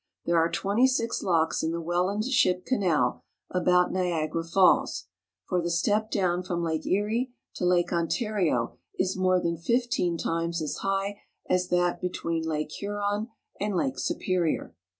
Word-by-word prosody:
There 170 - +1
are 165 +1 +3
twenty 205 +9 +2
six 235 -3 -1
locks 165 -3 +1
in 160 - 0
the 170 - -2
Welland 180 +5 0
Ship 185 -9 +2
Canal 190 - +1 0.3
about 180 0 +3
Nia 175 -4 0
gara 165 +1 -3
Falls, 180 - +3 0.4
for 180 -1 +1
the 170 - -2
step 205 +5 +1
down 180 -4 +1
from 175 -2 -3
Lake 160 -1 -2
Erie 220 +6 0 0.3
to - - -1
Lake 180 0 +2
Ontario 170 - 0 0.2
is 185 0 0
more 185 -1 +3
than 170 -1 -1
fifteen 180 -3 0
times 165 +1 -1
as 155 -2 -3
high 195 +1 -2 0.3
as 180 0 +1
that 175 -1 +1
be 180 - 0
tween 165 -2 -2
Lake 155 -1 -2
Huron 205 +2 -2 0.3
and 205 -1 -1
Lake 265 +7 -1
Superior. 175 - -1
180 Hz, 160 wpm, -27 LUFS, 170-205 Hz, 0.4 s, are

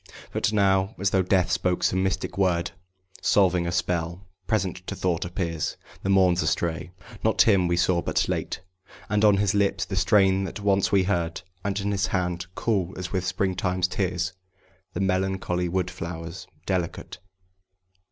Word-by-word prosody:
But 105 - +1
now, 95 -1 +2
as 100 +1 0
though 95 - +3
Death 90 0 +2
spoke 90 -1 0
some 95 - +2
mystic 95 -1 -1
word 90 -3 +1 0.5
Solving 90 -3 +3
a - - -1
spell, 85 0 -2 0.2
present 95 -4 0
to - - -3
thought 85 -3 -1
appears 85 -3 -3 0.2
The 95 - -2
morn's 95 -2 +4
estray, 85 -1 -1 0.3
not 110 - +4
him 95 -5 +4
we 85 0 +1
saw 90 -1 +2
but - - 0
late; - - -2 0.5
And 105 0 +1
on 105 -2 +6
his 100 0 +2
lips 100 -1 +1
the - - -4
strain 95 -2 +4
that 95 - -6
once 100 -1 +2
we 100 -2 +4
heard, 85 -3 -1 0.2
And 100 0 -1
in 100 +1 -1
his 95 -1 +1
hand, 90 -1 -1
cool 95 -5 -1
as 90 -1 -5
with 95 -2 -1
Springtime's 90 -1 0
tears, 90 -1 -1 0.6
The 90 - -3
melancholy 95 -2 0
wood 90 0 -1
flowers 85 0 -7 0.2
delicate. 90 -3 -3
95 Hz, 160 wpm, -25 LUFS, 90-100 Hz, 0.6 s, on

